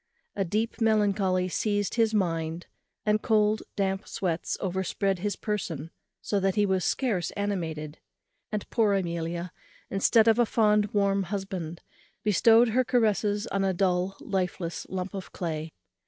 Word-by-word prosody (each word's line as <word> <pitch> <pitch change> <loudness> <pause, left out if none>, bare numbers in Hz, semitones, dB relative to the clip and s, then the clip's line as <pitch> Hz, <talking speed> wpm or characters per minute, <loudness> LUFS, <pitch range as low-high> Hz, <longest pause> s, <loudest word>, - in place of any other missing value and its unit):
A 195 - +1
deep 215 +6 -2
melancholy 200 -4 +2
seized 205 +3 -1
his 225 -2 +3
mind, 165 -4 -1 0.4
and 210 0 +2
cold 215 -1 +2
damp 195 0 -1
sweats 170 -3 -2
overspread 190 +1 -1
his 205 +1 -1
person, 170 -7 -4 0.3
so 205 - 0
that 195 -1 +1
he 210 -1 +3
was 190 -2 +1
scarce 205 -8 0
animated; 165 -7 -3 0.5
and 210 -1 -3
poor 215 -4 +3
Amelia, 170 -1 -2 0.4
instead 220 +3 +4
of 225 +1 +5
a 240 - +5
fond 210 -2 +3
warm 200 -1 +2
husband, 190 -5 -4 0.4
bestowed 225 +3 +5
her 255 +4 +2
caresses 215 -3 +1
on 195 0 +1
a 190 -1 +1
dull 185 +1 +1
lifeless 180 -3 -3
lump 185 +1 -4
of 195 -1 -6
clay. 160 -2 -4
195 Hz, 140 wpm, -27 LUFS, 180-210 Hz, 0.5 s, of